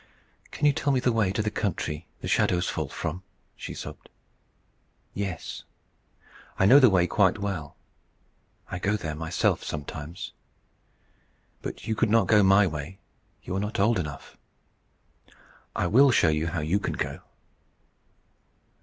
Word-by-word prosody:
"Can 150 - -2
you 145 - +5
tell 140 +1 0
me 130 - +2
the 125 0 +2
way 110 -5 +1
to 105 +2 -1
the 105 - -1
country 90 -6 -3
the - - -5
shadows 90 0 +2
fall - - -2
from?" 90 - -4 0.3
she - - -7
sobbed. - - -9 1.0
"Yes. 95 -4 -5 0.9
I 95 - +3
know 130 +8 +8
the 130 -3 +7
way 90 -3 +3
quite 95 +1 +2
well. 95 -8 -4 1.0
I 90 - -3
go 100 +3 0
there 80 -6 -4
myself 80 +1 0
sometimes. 75 +2 -6 1.3
But - - -7
you 110 - +1
could 110 +1 +1
not 115 +1 +4
go 105 -2 +5
my 95 +1 +6
way; 80 +2 -5 0.5
you 90 - -4
are - - 0
not 105 +2 -3
old 105 0 +3
enough. 75 -4 -7 1.4
I - - 0
will 130 +10 +6
show 85 -9 +4
you 75 +1 0
how 85 -1 -2
you 80 +7 +1
can - - -3
go." - - -3
95 Hz, 150 wpm, -26 LUFS, 80-105 Hz, 1.4 s, know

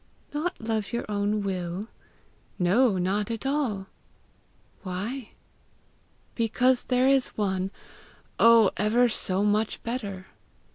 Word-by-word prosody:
'Not 310 +4 -2
love 220 -2 -2
your 235 - -2
own 205 0 -1
will?' 185 +1 -3 0.7
'No, 200 +4 +3
not 195 +4 0
at 230 +2 -4
all!' 265 -9 -1 1.0
'Why?' 210 +7 -5 1.0
'Because 245 +2 +2
there 255 0 +2
is 270 -1 +4
one 190 -2 0 0.7
oh, 230 -3 +7
ever 225 +4 +3
so 195 -2 0
much 210 +1 0
better! 205 -6 -4
215 Hz, 105 wpm, -26 LUFS, 195-245 Hz, 1.0 s, oh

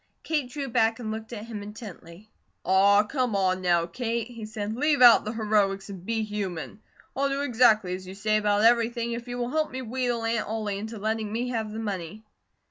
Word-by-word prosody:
Kate 295 -6 -1
drew 275 +1 -4
back 225 -2 +2
and 225 -3 -5
looked 220 +1 -6
at 220 -2 -6
him 220 -3 -6
intently. 205 -3 -10 0.4
"Aw, 200 +2 +5
come 250 0 -1
on 185 -1 +1
now, 175 -2 +2
Kate," 230 +5 -3
he 230 -3 -8
said. 215 -1 -4
"Leave 295 +3 +2
out 245 -2 +8
the 215 - -2
heroics 205 -3 0
and 185 -3 -9
be 225 +2 -1
human. 205 -2 -5 0.3
I'll 275 +1 +1
do 275 +1 -1
exactly 220 -7 +3
as 185 0 -6
you 190 - -8
say 215 +2 +1
about 210 0 +2
everything 235 0 +3
if 235 +1 -5
you 245 0 -5
will 240 0 -2
help 310 +1 0
me 260 0 -5
wheedle 245 -1 -2
Aunt 230 -1 0
Ollie 210 -2 -3
into 220 +2 -6
letting 215 0 -2
me 240 +3 -2
have 220 -3 -2
the 215 - -6
money." 205 -1 -5
220 Hz, 210 wpm, -26 LUFS, 205-240 Hz, 0.4 s, out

